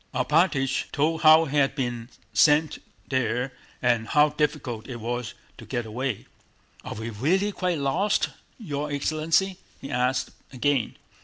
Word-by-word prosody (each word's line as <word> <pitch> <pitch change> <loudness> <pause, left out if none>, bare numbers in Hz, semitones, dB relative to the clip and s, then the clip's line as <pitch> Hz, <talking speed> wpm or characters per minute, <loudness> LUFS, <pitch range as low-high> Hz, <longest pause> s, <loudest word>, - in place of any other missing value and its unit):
Alpátych 135 0 +1
told 155 +2 0
how 155 +1 +7
he 145 0 -2
had 135 -1 +3
been 120 -4 -3 0.2
sent 150 0 +4 0.3
there 125 0 -1 0.3
and 120 -2 +2
how 150 0 +4
difficult 145 -7 -2
it 130 - -6
was 120 +1 -4 0.2
to - - -9
get 120 -1 -3
away. 120 +1 -3 0.6
"Are - - -6
we 110 +2 -5
really 180 - +1
quite 180 -3 -1
lost, 175 +9 +1 0.3
your 150 - -4
excellency?" 155 +6 +1 0.2
he 140 - -8
asked 125 +1 0 0.2
again. 135 -2 0
140 Hz, 140 wpm, -25 LUFS, 125-155 Hz, 0.6 s, how